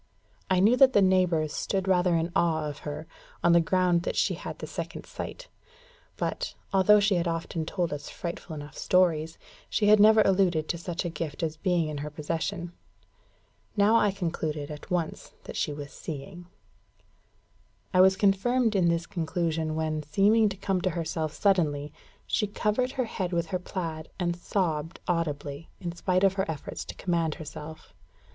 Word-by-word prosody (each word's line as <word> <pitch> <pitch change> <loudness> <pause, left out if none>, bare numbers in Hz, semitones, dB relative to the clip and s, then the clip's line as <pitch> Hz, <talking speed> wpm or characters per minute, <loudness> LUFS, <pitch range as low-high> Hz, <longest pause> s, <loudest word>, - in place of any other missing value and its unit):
I 185 -1 +3
knew 215 +6 +5
that 265 -1 +6
the 205 - +5
neighbours 180 -5 +2
stood 195 -1 -2
rather 180 -2 +3
in 165 +1 0
awe 160 -4 +2
of 145 -1 -6
her, 150 +2 -6 0.4
on 175 - +5
the 170 - +6
ground 180 0 +2
that - - -3
she - - +2
had - - -6
the - - -6
second - - -6
sight; - - -7 0.7
but, - - -3 0.2
although 195 +2 +6
she 200 -3 +3
often 165 -1 -2
told 175 -4 -1
us 145 0 -6
frightful 170 -1 -6
enough 145 -1 -9
stories, 165 -3 +2 0.3
she 205 -1 +2
had 215 0 +7
never 215 +1 +7
alluded 185 -5 +2
to 170 - -1
such 175 +1 -4
a - - -1
gift 165 0 -5
as 160 -1 -1
being 175 -1 +1
in 150 -1 -4
her 150 +1 -4
possession. 170 +4 -3 1.0
Now 205 +3 +5
I 210 -2 +4
concluded 160 -6 -3
at 150 -1 -9
once 175 -3 -3
that - - -8
she - - 0
was 145 -1 -7
seeing. 170 +4 -8 1.5
I 185 - +6
was 190 0 +5
confirmed 220 +4 +2
in 180 -3 +4
this 170 0 0
conclusion 160 -2 -2
when, 155 -1 -1
seeming 205 +8 +3
to 195 - -7
come 190 -1 -1
to 185 - +1
herself 160 -2 -2
suddenly, 150 -7 +1 0.3
she 210 - 0
covered 215 +5 0
her 255 -3 0
head 190 -5 -3
with 170 -1 +1
her 185 - +1
plaid, 165 -4 -5
and 175 -1 0
sobbed 170 -3 -2
audibly, 150 -3 -2
in 175 -2 -4
spite 185 +2 0
of 195 -1 +5
her 190 0 0
efforts 155 -3 -5
to - - -8
command 170 -4 0
herself. 155 0 -9
175 Hz, 175 wpm, -28 LUFS, 160-190 Hz, 1.5 s, had